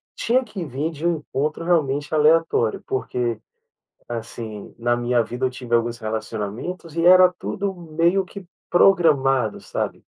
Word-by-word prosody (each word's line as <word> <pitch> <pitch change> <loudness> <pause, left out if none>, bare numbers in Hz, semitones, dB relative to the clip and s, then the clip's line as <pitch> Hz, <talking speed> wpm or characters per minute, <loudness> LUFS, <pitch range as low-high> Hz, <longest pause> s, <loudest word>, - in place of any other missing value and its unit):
tinha 255 +3 +1
que 195 -7 -6
vir 145 +3 -3
de 160 +2 -3
um 170 -1 +1
encontro 150 +2 -3
realmente 150 -4 0
aleatório, 155 -7 +3
porque, 120 -3 -2 0.7
assim, 115 -2 -7
na 120 +1 +1
minha 120 0 +1
vida 125 +3 -3
eu - - +1
tive 125 -2 -2
alguns 115 0 0
relacionamentos, 110 - -5
e 165 0 +1
era 185 0 +8
tudo 200 0 -3
meio 170 +3 +1
que 195 +1 -10 0.3
programado, 135 - +3
sabe? - - -4
145 Hz, 140 wpm, -22 LUFS, 120-170 Hz, 0.7 s, era